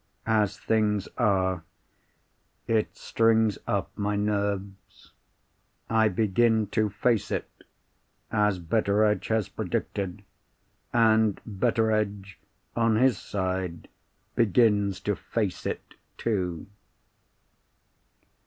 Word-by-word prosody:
As 105 -3 +1
things 105 -3 +1
are, 95 -6 +1 1.0
it 110 -2 0
strings 110 -2 +2
up - - -2
my 105 0 -1
nerves. 100 -1 -3 0.8
I 110 -1 +4
begin 110 +2 +2
to 110 -1 +1
"face 105 +2 0
it," - - -2 0.8
as 105 -3 +2
Betteredge 105 +4 +1
has 110 -3 +1
predicted. 100 0 -3 0.7
And 110 -3 +3
Betteredge, 105 -2 0 0.4
on 115 -1 +3
his 125 -1 +3
side, 95 -3 -3 0.4
begins 105 -3 +3
to 105 0 0
"face 105 -3 -3
it," - - -5 0.2
too. 90 -7 -2
105 Hz, 90 wpm, -27 LUFS, 100-110 Hz, 1.0 s, I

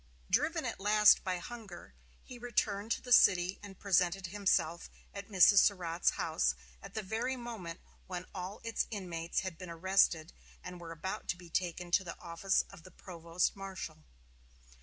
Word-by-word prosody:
Driven - - +1
at - - -4
last 210 +1 +6
by 185 -2 -1
hunger, 200 - -9 0.3
he 245 - -11
returned 220 -3 -1
to - - -6
the 250 - -8
city 185 -4 +5
and 200 -2 -11
presented 185 -1 +1
himself 180 -3 0 0.2
at 200 +1 -8
Mrs. 195 0 +7
Surratt's 175 -5 +2
house 65 - +1 0.3
at - - -11
the 215 - -2
very 225 +6 -2
moment 225 -9 -7 0.3
when 180 -1 -5
all 190 +1 -6
its 230 0 -1
inmates 175 -6 -3
had 185 -4 -6
been 185 - -8
arrested 170 -1 +2 0.3
and 180 -1 -8
were 165 -1 -8
about 165 +4 -5
to 175 - -1
be 175 -2 -14
taken 175 0 -2
to 190 - +4
the 170 - -8
office 170 +3 0
of - - -13
the 185 - -13
provost 170 -1 -2
marshal. 195 - -7
185 Hz, 165 wpm, -33 LUFS, 170-205 Hz, 0.3 s, Mrs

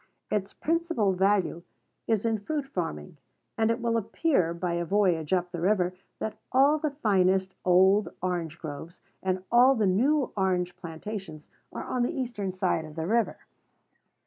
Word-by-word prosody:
Its 200 -2 -1
principal 330 - 0
value 190 -2 +1 0.5
is 220 -1 +1
in 225 -1 +1
fruit 290 +7 -3
farming; 165 - -5 0.4
and 220 0 +2
it 230 +1 0
will 235 -1 0
appear, 220 - +1
by 170 +1 -2
a 170 0 -1
voyage 175 -4 +1
up 180 -1 +1
the 175 -2 -5
river, 185 -1 +2 0.2
that 220 - -5
all 280 +4 +4
the 305 0 0
finest 190 -8 +1
old 190 +3 +4
orange 175 -3 -2
groves 160 +2 -8 0.2
and 185 -1 -1
all 250 +3 +6
the 220 -4 +1
new 260 +10 +2
orange 180 -2 0
plantations 170 -1 -7 0.2
are - - -5
on 250 - -2
the 245 +8 0
eastern 230 -7 -3
side 185 -3 0
of 155 -1 -10
the 160 -1 -3
river. 225 +4 +1
190 Hz, 160 wpm, -28 LUFS, 175-230 Hz, 0.5 s, all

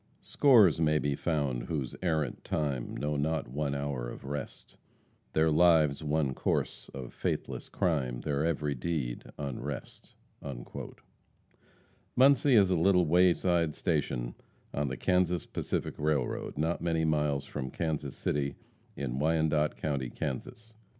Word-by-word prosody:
"Scores 110 - +5
may 75 -1 +3
be 70 -1 0
found 70 -7 -1
whose 70 -6 -3
errant 80 -7 -1
time 70 -5 -2
Know 75 0 -1
not 80 +2 -1
one 70 +2 -2
hour 70 -4 -3
of - - -9
rest; 70 -1 -6 0.6
Their 80 0 +3
lives 80 -3 +4
one 75 -3 +1
course - - -2
of 65 -3 -8
faithless - - -3
crime, 65 -8 0
Their 75 0 -1
every 75 -3 0
deed 65 -3 -3
unrest." 70 -1 -6 2.0
Muncie 135 0 +5
is 100 -4 +5
a - - +4
little 90 +1 +4
wayside 85 -1 +3
station 70 -8 -1 0.4
on 70 0 0
the 65 0 -4
Kansas 90 -1 +1
Pacific - - -3
Railroad, 75 -4 -1
not 80 +3 0
many 80 -1 +1
miles 75 -3 +1
from 65 -2 -5
Kansas 75 -2 -3
City, 70 -1 -1 0.4
in 65 -2 -3
Wyandotte 80 -1 +2
county, 70 -5 -2
Kansas. 110 - -5
75 Hz, 130 wpm, -30 LUFS, 70-85 Hz, 2.0 s, Scores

